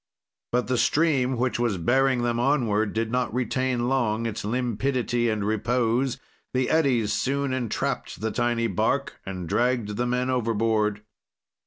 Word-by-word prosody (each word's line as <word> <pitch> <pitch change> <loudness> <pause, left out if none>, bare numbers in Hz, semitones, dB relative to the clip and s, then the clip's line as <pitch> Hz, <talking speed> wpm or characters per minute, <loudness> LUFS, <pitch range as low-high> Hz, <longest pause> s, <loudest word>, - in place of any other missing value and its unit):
"But 125 0 +1
the 125 -1 0
stream, 135 -5 +2
which 125 0 0
was 115 -5 +1
bearing 130 +7 +2
them 120 -1 0
onward, 115 -6 +1
did 115 0 -1
not 125 0 0
retain 125 +1 0
long 115 -4 0
its 115 -2 -3
limpidity 120 +1 0
and 105 -2 -1
repose; 120 +4 0 0.4
the 130 -1 +1
eddies 130 -9 +2
soon 140 0 0
entrapped 125 -4 -2
the 110 +1 -2
tiny 120 -1 0
bark 100 -6 -1
and 90 -3 -5
dragged 110 0 0
the 125 - 0
men 125 +1 0
overboard. 110 -3 0
120 Hz, 145 wpm, -25 LUFS, 110-130 Hz, 0.4 s, stream